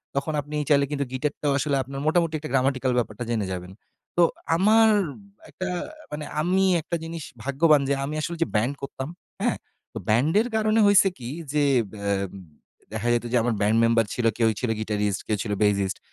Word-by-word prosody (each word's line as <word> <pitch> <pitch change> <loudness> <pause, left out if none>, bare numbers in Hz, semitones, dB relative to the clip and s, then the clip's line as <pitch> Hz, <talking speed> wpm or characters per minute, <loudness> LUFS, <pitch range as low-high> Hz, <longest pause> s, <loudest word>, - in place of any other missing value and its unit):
তখন 140 +3 -1
আপনি 150 +2 -8
চাইলে 140 -1 +5
কিন্তু 140 -1 -1
গিটারটাও 145 +2 -1
আসলে 145 0 0
আপনার 135 +2 -7
মোটামুটি 165 0 +2
একটা 150 - -7
গ্রামাটিক্যাল 130 -1 +1
ব্যাপারটা 115 -1 -2
জেনে 110 -4 0
যাবেন। 90 0 -5 0.5
তো 175 - +6 0.3
আমার 220 +5 +5 0.3
উব - - -14 0.3
একটা 185 - -5 0.4
মানে 150 0 -5 0.2
আমি 185 +4 +2 0.2
একটা 170 +2 -3
জিনিস 165 -1 -6 0.2
ভাগ্যবান 145 +2 +4
যে - - +3
আমি 150 +2 -3
আসলে 170 +2 -3
যে - - -4
ব্যান্ড 115 +6 +2
করতাম 135 +1 -5 0.3
হ্যা? - - +2 0.4
তো - - -6
ব্যান্ডের 155 - +3
কারণে 215 0 +2
হইছে 200 -1 +6
কি 120 -2 -8 0.3
যে, 150 -1 +2 0.4
আ 100 - 0 0.8
দেখা 110 +2 -2
যেত 120 0 0
যে, 125 - +3
আমার 120 0 +1
ব্যান্ড 105 +2 +3
মেম্বার 115 0 +3
ছিল 120 - -2
কেউ 115 -1 +3
ছিল 125 - -1
গিটারিস্ট 105 -2 -1
কেউ 105 - 0
ছিল 105 - -4
বেইসিস্ট। 100 -1 +1
140 Hz, 180 wpm, -25 LUFS, 115-160 Hz, 0.8 s, তো